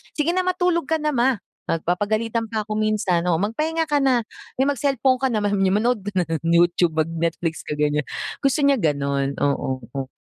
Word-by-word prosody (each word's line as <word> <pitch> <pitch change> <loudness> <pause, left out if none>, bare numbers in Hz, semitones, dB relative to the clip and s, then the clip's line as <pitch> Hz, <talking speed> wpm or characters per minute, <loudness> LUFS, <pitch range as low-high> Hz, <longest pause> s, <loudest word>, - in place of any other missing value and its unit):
Sige 305 +2 +1
na, 370 - +2
matulog 360 -2 +1
ka 320 - +2
na 300 0 0
Ma." 250 +1 +3 0.4
Nag 165 -1 -1
Papagalitan 215 +5 0
pa 220 -1 -1
ako 215 - -3
minsan, 210 -5 +1
oo. - - +3
"Magpahinga 310 +10 -1
ka 290 - +4
na. 250 -4 +3 0.4
Mi, - - +5
mag-cellphone 275 -2 +1
ka - - +4
naman, 205 -2 0
sabi 195 - +1
niya 190 - +2
"manood 240 0 +1
ka 205 - -4
ng 165 -1 -1
YouTube, 175 -1 +3
mag 155 - +2
Netflix 165 0 -2
ka, 150 - -2
ganyan. 150 0 +1 0.4
Gusto 275 +2 +2
niya 280 0 +5
ganun, 140 -4 0
oo, 135 -2 0 0.2
o 135 -1 -3
215 Hz, 200 wpm, -22 LUFS, 165-270 Hz, 0.4 s, Mi